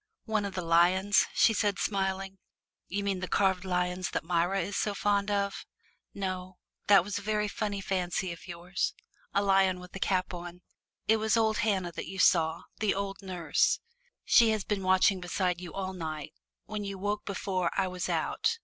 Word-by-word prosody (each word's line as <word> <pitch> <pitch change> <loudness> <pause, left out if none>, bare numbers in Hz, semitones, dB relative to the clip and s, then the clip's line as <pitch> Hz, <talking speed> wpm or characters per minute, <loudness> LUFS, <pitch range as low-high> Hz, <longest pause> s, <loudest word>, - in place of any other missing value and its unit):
"One 220 -3 0
of 200 - -5
the 185 - -2
lions?" 180 +4 +4
she 225 - +5
said, 205 -2 +1
smiling. 195 -1 -2 0.5
"You 200 +3 -2
mean 195 -2 -1
the 185 - -4
carved 190 -2 +2
lions 180 0 -1
that - - -2
Myra 175 +3 +1
is 195 +3 -4
so 205 -1 0
fond 200 0 +1
of. 200 -1 -1 0.5
No 185 -2 -4 0.3
that 200 -3 +7
was 205 +2 -3
a - - -9
very 210 +1 0
funny 205 -1 -3
fancy 185 -1 -1
of 170 +2 -10
yours 175 +1 -3 0.4
a 200 - +1
lion 195 -2 +3
with 180 +1 -12
a - - -5
cap 185 -1 0
on! 175 0 -8 0.4
It 220 - +5
was 220 +1 +2
old 220 -2 +2
Hannah 190 -5 0
that - - -6
you 190 - -7
saw, 165 -3 +3 0.2
the 215 -2 +1
old 195 0 -4
nurse. 180 -4 +1 0.5
She 230 -2 +6
has 215 -2 0
been 205 -1 -2
watching 185 0 +3
beside 180 0 -1
you 180 - -7
all 190 -1 -4
night. 155 -4 -5 0.3
When 210 -1 -4
you 200 -1 -4
awoke 205 +2 -2
before, 185 -2 -1
I 190 - +2
was 180 -1 -4
out. 460 - 0
190 Hz, 185 wpm, -29 LUFS, 180-200 Hz, 0.5 s, that